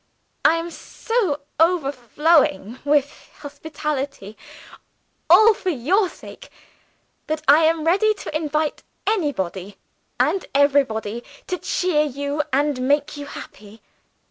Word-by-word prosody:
I 315 - +5
am 335 +1 -4
so 400 -7 -2 0.2
overflowing 285 - +2
with 285 0 0
hospitality 285 -6 -5 0.9
(all 430 +6 +8
for 380 - -4
your 360 - +1
sake) - - -13 0.8
that 310 0 -3
I 305 +3 +6
am 320 0 +1
ready 400 +6 +3
to 345 - -8
invite 305 0 -1 0.2
anybody, 205 - -2 0.4
and 385 - +1
everybody, 240 -6 +1 0.2
to 365 - -3
cheer 355 -5 0
you 285 0 -2
and 280 -1 +1
make 290 +1 +1
you 290 0 -7
happy. 210 -4 -11
295 Hz, 110 wpm, -22 LUFS, 275-330 Hz, 0.9 s, all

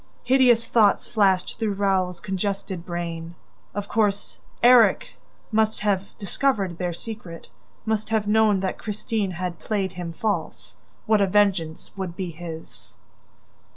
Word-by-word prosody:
..." - - -35
Hideous 245 -3 +5
thoughts 220 -3 +3
flashed 195 -5 +1
through 220 -3 0
Raoul's 190 -3 0
congested 195 -2 -3
brain. 170 -1 -5 0.4
Of 205 -1 -3
course, 205 -2 0 0.2
Erik 240 -5 +6 0.4
must 220 0 +1
have 200 -2 -1
discovered 200 -4 -1
their 180 -1 -1
secret, 175 -2 -8 0.4
must 220 -1 -1
have 220 -2 +1
known 210 -2 +3
that 190 - -2
Christine 210 -1 -2
had 180 -1 -4
played 195 -4 -1
him 175 -2 -6
false. 180 -1 -3 0.3
What 215 -1 +3
a 200 - +3
vengeance 185 -5 +1
would 185 -3 -5
be 180 -2 -4
his! 155 -10 -10
195 Hz, 135 wpm, -24 LUFS, 175-215 Hz, 0.4 s, Erik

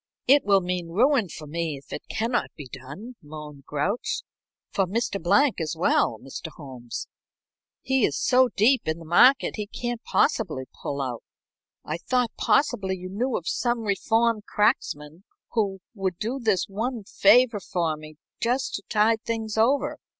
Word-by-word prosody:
"It 280 +3 +6
will 200 -1 +4
mean 180 -1 -2
ruin 225 - +2
for 155 - -8
me 160 -1 -3
if 135 - -12
it - - -7
cannot 235 +2 0
be 145 -4 -9
done," 140 - -10
moaned 150 -2 -10
Grouch. 180 +11 -1 0.5
"For 195 -2 +1
Mr. 200 0 -2
Blank 205 - +3
as 155 -2 -2
well, - - +2
Mr. - - -8
Holmes; 125 -4 -7 0.8
he 265 -2 +2
is 145 - +2
so 255 0 +4
deep 245 +2 +4
in 155 +1 0
the 165 - -11
market 250 +14 +5
he 210 -1 -3
can't 240 +2 -4
possibly 160 - +1 0.2
pull 140 -1 -2
out. 125 -3 -4 0.6
I 155 +2 -3
thought 250 +3 0
possibly 205 -10 +1
you 185 0 -7
knew 235 +6 -1
of 170 - -7
some 240 -1 0
reformed 225 +1 +1
cracksman 160 -5 0 0.3
who 200 -4 -1
would 190 -4 -2
do 235 +7 -3
this 215 -7 +1
one 225 +3 -3
favor 230 +3 +4
for 170 -4 -1
me 155 0 -12 0.3
just 250 +3 0
to 200 - -4
tide 220 +1 +3
things 225 -2 -3
over. 250 +6 +2
200 Hz, 160 wpm, -25 LUFS, 160-235 Hz, 0.8 s, It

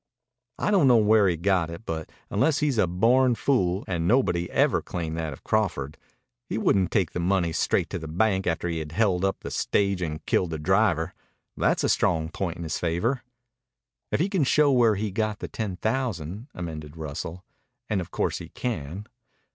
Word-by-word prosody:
"I - - 0
don't 185 -9 +5
know 125 -2 +6
where 105 -1 +5
he 85 -2 +1
got 90 -1 +1
it, 85 +7 -9
but 80 -1 -4 0.2
unless 145 +9 +2
he's 140 -5 +1
a 95 - +4
born 120 +8 +3
fool 95 -8 +1
and 85 -2 -1
nobody 90 -8 +2
ever - - +2
claimed 80 -2 -4
that 80 -2 -2
of 70 - -10
Crawford 85 -10 -1 0.5
he - - -2
wouldn't 95 -2 +2
take 95 -6 +1
the - - -4
money 90 -1 +1
straight - - +1
to - - -3
the 80 - -7
bank 95 +4 +1
after 85 +1 0
he 85 -1 -2
had 75 0 -6
held 95 -2 +2
up 95 0 0
the - - -6
stage 100 -2 0
and 75 -3 -4
killed 90 - +1
the 80 - -3
driver. 90 0 +2 0.4
That's - - +1
a - - +3
strong 80 -2 +1
point 85 0 -3
in 85 - -6
his 80 -1 -3
favor." 100 +10 0 0.9
"If - - +1
he 175 - +2
can 195 -6 +1
show 145 +2 +4
where 120 -4 +4
he 105 +1 -2
got 110 +1 -1
the - - -6
ten 105 -5 -4
thousand," 110 - -2
amended 80 -3 -6
Russell. 80 +4 -6 0.4
"And 105 -4 0
of 85 - -7
course - - -1
he - - -9
can." 95 - -4
95 Hz, 195 wpm, -26 LUFS, 80-110 Hz, 0.9 s, know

